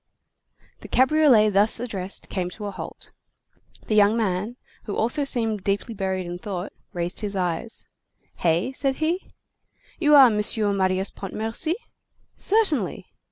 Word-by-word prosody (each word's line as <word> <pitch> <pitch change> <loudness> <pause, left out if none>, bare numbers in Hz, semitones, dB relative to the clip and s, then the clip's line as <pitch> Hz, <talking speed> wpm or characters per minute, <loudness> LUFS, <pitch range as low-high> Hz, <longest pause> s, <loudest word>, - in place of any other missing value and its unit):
The - - -10
cabriolet 260 -5 +4
thus 205 +4 +3
addressed 200 -6 -5
came 180 -2 -3
to 210 +3 -8
a 200 - -3
halt. - - -7 0.7
The - - -2
young 210 +1 +5
man, 210 +1 -1 0.3
who 205 - -4
also 240 +7 +1
seemed 225 -7 0
deeply 200 +4 -1
buried 190 -2 -2
in 175 0 -6
thought, 185 -1 -5 0.2
raised 175 -1 -3
his 205 -2 -4
eyes:— 180 +4 -3 0.5
"Hey?" 170 +9 +1
said 270 0 0
he. 330 +5 -2 0.7
"You 300 -3 +5
are 275 -2 +10
M. 210 - -1 0.4
Marius 190 0 0
Pontmercy?" 225 - -3 0.6
"Certainly." 400 - +1
210 Hz, 135 wpm, -24 LUFS, 190-260 Hz, 0.7 s, are